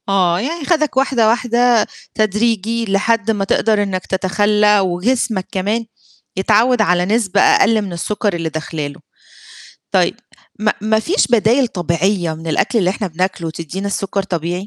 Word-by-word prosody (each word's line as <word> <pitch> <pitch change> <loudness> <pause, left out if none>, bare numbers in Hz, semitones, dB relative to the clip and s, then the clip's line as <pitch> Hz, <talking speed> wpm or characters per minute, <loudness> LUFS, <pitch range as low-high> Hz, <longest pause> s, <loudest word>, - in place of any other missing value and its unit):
آه 180 -3 +2
يعني 300 - -4
خدك 305 -5 0
واحدة، 260 -4 +2
واحدة 240 0 +2 0.3
تدريجي 220 +1 0
لحد 225 +2 +1
ما 200 -2 -1
تقدر 210 +1 +1
إنك 185 -2 -4
تتخلّى 205 +2 +2
وجسمك 190 +2 -1
كمان 210 +5 -1 0.5
يتعوّد 220 +5 +3
على 180 -3 +2
نسبة 205 -2 +1
أقل 220 -1 +4
من 195 -4 -5
السُكّر 205 +4 -2
اللي 165 -1 -3
داخلة 155 -1 -4
له، 145 - -11 0.9
طيب - - +2 0.4
ما 210 0 +1
ما 220 +1 +1
فيش 365 - +1
بدايل 240 +2 +3
طبيعية 175 -1 -1
من 160 +1 -10
الأكل 165 +9 0
اللي 185 -3 +2
إحنا 200 +1 -3
بناكله 175 -1 -3
تدّينا 170 +5 -6
السُكّر 195 0 -2
طبيعي؟ 175 0 -4
205 Hz, 145 wpm, -17 LUFS, 180-225 Hz, 0.9 s, أقل